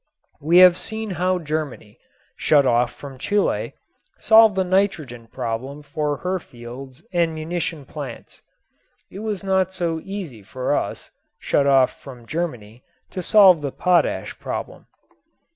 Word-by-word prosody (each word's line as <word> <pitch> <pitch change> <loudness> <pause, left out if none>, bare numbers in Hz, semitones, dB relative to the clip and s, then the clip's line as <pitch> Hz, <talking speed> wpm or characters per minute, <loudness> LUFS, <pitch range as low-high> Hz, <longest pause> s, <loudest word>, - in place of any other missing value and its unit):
We 165 +5 +3
have 180 -1 +8
seen 220 -1 -5
how 185 +1 0
Germany 155 -9 -5 0.4
shut 145 -3 +3
off 120 -1 +2
from 135 -2 -11
Chile 205 +7 0 0.4
solved 220 -2 +6
the 190 - +2
nitrogen 165 - -1
problem 130 +5 -5
for 145 0 -2
her 185 +1 0
fields 130 +2 -11
and 170 -2 +1
munition 160 -2 -4
plants. 140 -4 -9 0.7
It 195 - -8
was 210 -4 -4
not 190 -1 +1
so 165 -3 -2
easy 185 - -7
for 125 +6 -3
us - - -4 0.3
shut 140 - +1
off 135 -2 +3
from 125 -4 -11
Germany 125 -7 -5 0.3
to 185 - -4
solve 185 -3 +6
the 140 -2 -3
potash 180 +3 0
problem. - - -6
155 Hz, 135 wpm, -22 LUFS, 130-185 Hz, 0.7 s, have